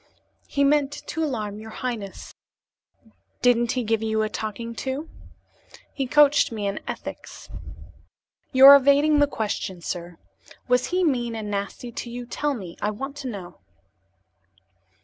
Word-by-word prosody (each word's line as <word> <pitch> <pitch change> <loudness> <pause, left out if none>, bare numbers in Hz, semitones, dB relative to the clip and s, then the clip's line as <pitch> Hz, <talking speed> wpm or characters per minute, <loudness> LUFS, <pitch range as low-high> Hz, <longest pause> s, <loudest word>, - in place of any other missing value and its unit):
"He 280 - 0
meant 285 0 +3
to 320 +1 -3
alarm 215 -8 -3
your 220 +1 -9
highness." 220 -4 -6 1.1
"Didn't 240 -1 +3
he 255 - -1
give 225 0 0
you 220 -1 0
a 215 - -1
talking 220 +2 -5
to?" 275 +4 -3 0.9
"He 270 -2 -2
coached 295 0 +5
me 215 -3 -4
in 200 0 -2
ethics." - - -8 1.0
"You 260 +1 +7
are 280 +1 +13
evading 285 +2 +4
the 290 - +5
question, 210 -7 -3
sir. 175 0 -6 0.5
Was 250 0 +2
he 365 +1 0
mean 240 -7 0
and 215 -2 -5
nasty 200 +4 -4
to 235 - -6
you? 245 +1 -6
Tell 290 +4 -2
me; 185 -7 -8
I 210 - +1
want 270 +7 -5
to 280 -2 -6
know." 195 -7 -8
240 Hz, 150 wpm, -24 LUFS, 215-280 Hz, 1.1 s, are